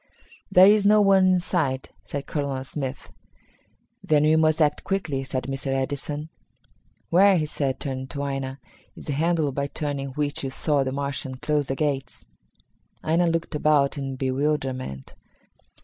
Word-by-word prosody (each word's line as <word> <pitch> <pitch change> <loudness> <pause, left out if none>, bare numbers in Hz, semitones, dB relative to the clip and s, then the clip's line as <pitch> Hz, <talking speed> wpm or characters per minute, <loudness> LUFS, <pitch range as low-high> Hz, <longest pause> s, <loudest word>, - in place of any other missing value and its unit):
"There 185 0 +8
is 205 +1 +5
no 210 +1 +5
one 190 -2 +5
in 180 - +3
sight," 140 -8 -1
said 140 -1 -5
Colonel 140 -3 -3
Smith. 135 -1 -6 0.9
"Then 150 -1 +3
we 155 +1 +4
must 155 0 +3
act 150 -2 +2
quickly," 160 -9 -2
said 130 -1 -3
Mr. 135 +2 -4
Edison. 145 +3 -2 0.8
"Where," 190 +2 +6
he 155 - 0
said, 140 -3 -2
turning 130 -2 -4
to 140 +1 -5
Aina, 135 -1 -4 0.4
"is - - -11
the 145 - -2
handle 160 0 +1
by 140 +1 -2
turning 145 -2 -3
which 145 0 -1
you 135 - -2
saw 140 +1 +1
the 130 - -3
Martian 140 -1 -3
close 145 +1 -1
the 135 - -2
gates?" 135 -5 -2 0.8
Aina 170 +2 +2
looked 165 0 -1
about 150 -2 +2
in 135 -2 -4
bewilderment. 130 - -2
145 Hz, 155 wpm, -24 LUFS, 135-155 Hz, 0.9 s, There